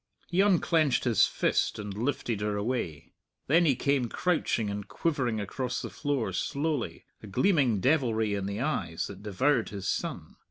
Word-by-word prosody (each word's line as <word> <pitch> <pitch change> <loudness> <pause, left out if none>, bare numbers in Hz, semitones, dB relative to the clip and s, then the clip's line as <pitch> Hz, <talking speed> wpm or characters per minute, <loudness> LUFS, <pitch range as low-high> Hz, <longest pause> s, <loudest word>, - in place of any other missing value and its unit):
He 180 +2 +3
unclenched 170 -7 +3
his 120 -6 +4
fist - - 0
and 105 -2 -5
lifted 115 -1 -2
her 105 -1 -1
away. 100 - -3 0.3
Then 165 +5 +4
he 140 -5 +4
came 135 -2 +1
crouching 120 - 0
and 100 0 -5
quivering 130 -9 -1
across 125 +5 -3
the - - -6
floor 140 -9 -1
slowly, 140 - -2 0.2
a - - -10
gleaming 130 - +2
devilry 115 -5 +2
in 100 -1 -2
the 100 +3 -3
eyes 85 - -1
that 100 -1 -9
devoured 110 +5 +1
his 100 -2 -5
son. - - -3
120 Hz, 160 wpm, -29 LUFS, 100-145 Hz, 0.3 s, his